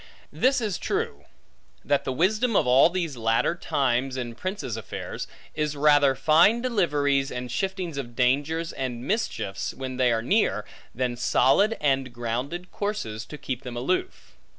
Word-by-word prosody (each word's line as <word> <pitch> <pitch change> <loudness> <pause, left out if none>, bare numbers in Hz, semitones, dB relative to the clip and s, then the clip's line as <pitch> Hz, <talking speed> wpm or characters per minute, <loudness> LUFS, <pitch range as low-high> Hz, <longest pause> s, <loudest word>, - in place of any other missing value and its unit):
This 265 0 +2
is 210 -5 -2
true, 450 +3 -3 0.6
that 140 -1 +1
the - - -1
wisdom 210 - +1
of - - +4
all 130 +5 +6
these 170 -5 -2
latter 115 +6 +2
times, 130 -5 0
in 120 -2 -4
princes' 185 - -4
affairs, 110 -4 -6 0.3
is 150 -1 -1
rather 145 -2 +4
fine 160 - +5
deliveries, 145 - +1
and 125 -1 -5
shiftings 185 +2 -3
of 120 -3 -7
dangers 145 +6 +1
and 125 -2 -4
mischiefs, 115 - -2
when 130 -1 -5
they 125 -2 +3
are 115 -1 0
near, 130 - +1 0.3
than 125 0 -1
solid 195 - +3
and 135 -3 +1
grounded 125 +10 -4
courses 160 - -4
to 150 - -8
keep 130 -3 -4
them 125 -3 -7
aloof. 185 - -2
140 Hz, 150 wpm, -26 LUFS, 125-185 Hz, 0.6 s, all